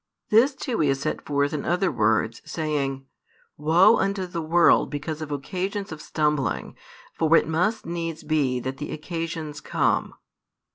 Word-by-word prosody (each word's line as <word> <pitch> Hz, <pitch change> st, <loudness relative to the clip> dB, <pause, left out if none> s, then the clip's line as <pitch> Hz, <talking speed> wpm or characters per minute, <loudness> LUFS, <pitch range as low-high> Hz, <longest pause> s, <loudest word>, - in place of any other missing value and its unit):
This 250 Hz, +6 st, +5 dB
too 250 Hz, -3 st, -3 dB
He 150 Hz, -, +3 dB
has 135 Hz, -1 st, +1 dB
set 155 Hz, -, -2 dB
forth 145 Hz, 0 st, 0 dB
in 150 Hz, -, -2 dB
other 180 Hz, +3 st, +1 dB
words, 110 Hz, +1 st, +1 dB
saying: 140 Hz, -4 st, -2 dB, 0.5 s
Woe 175 Hz, +9 st, +5 dB
unto 195 Hz, -1 st, 0 dB
the 175 Hz, -2 st, -4 dB
world 170 Hz, +2 st, +4 dB
because 150 Hz, +2 st, -4 dB
of 155 Hz, -1 st, -5 dB
occasions 185 Hz, +8 st, -3 dB
of 155 Hz, -1 st, -7 dB
stumbling! 150 Hz, -4 st, -1 dB, 0.4 s
for 165 Hz, 0 st, +4 dB
it -, -, +1 dB
must 180 Hz, +8 st, 0 dB
needs 165 Hz, -2 st, -4 dB
be 145 Hz, -5 st, +1 dB
that 130 Hz, +2 st, -4 dB
the 145 Hz, -, -5 dB
occasions 160 Hz, -2 st, -5 dB
come. -, -, 0 dB
155 Hz, 155 wpm, -25 LUFS, 145-175 Hz, 0.5 s, This